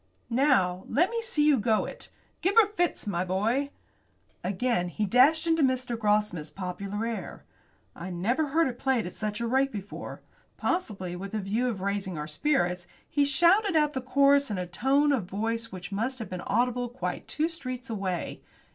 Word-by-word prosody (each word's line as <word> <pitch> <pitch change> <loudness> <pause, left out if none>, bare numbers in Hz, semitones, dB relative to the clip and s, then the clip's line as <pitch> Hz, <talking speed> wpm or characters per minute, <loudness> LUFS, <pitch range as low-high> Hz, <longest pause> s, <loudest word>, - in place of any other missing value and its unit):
"Now 195 -9 +2
let 350 +9 +2
me 465 0 -1
see 380 -11 +1
you 295 -4 +5
go 215 0 +2
it. - - -9 0.3
Give 380 +3 +1
her 455 -2 +8
fits, 350 -5 -1
my 180 -4 -1
boy." 220 +10 0 0.7
Again 190 -1 0
he 210 +5 -2
dashed 275 - +5
into 325 -1 +2
Mr. 255 -3 +1
Grossmith's 210 -7 0
popular 195 +4 -4
air. 225 -6 -5 0.5
I 170 +3 -7
never 230 - 0
heard 320 +3 +2
it 245 -2 -5
played 265 -4 +1
at 175 - -6
such 210 0 -3
a 235 - -1
rate 265 +3 +2
before. 205 -1 -7 0.3
Possibly 195 - -2
with 195 +3 -6
a - - 0
view 210 +6 -1
of 205 -6 -4
raising 195 -3 -2
our 150 - -3
spirits, 180 - 0 0.2
he 285 - +2
shouted 345 +7 +4
out 300 -1 +3
the 260 - -2
chorus 280 +2 +4
in 205 - -2
a 180 - -2
tone 270 +11 +2
of 245 -9 0
voice 225 +4 -2
which 185 0 -8
must 230 +6 -1
have 225 -6 -7
been 180 -1 -4
audible 245 +2 0
quite 250 +2 -5
two 310 +1 0
streets 255 -6 -6
away. 195 -6 -3
230 Hz, 180 wpm, -28 LUFS, 195-280 Hz, 0.7 s, her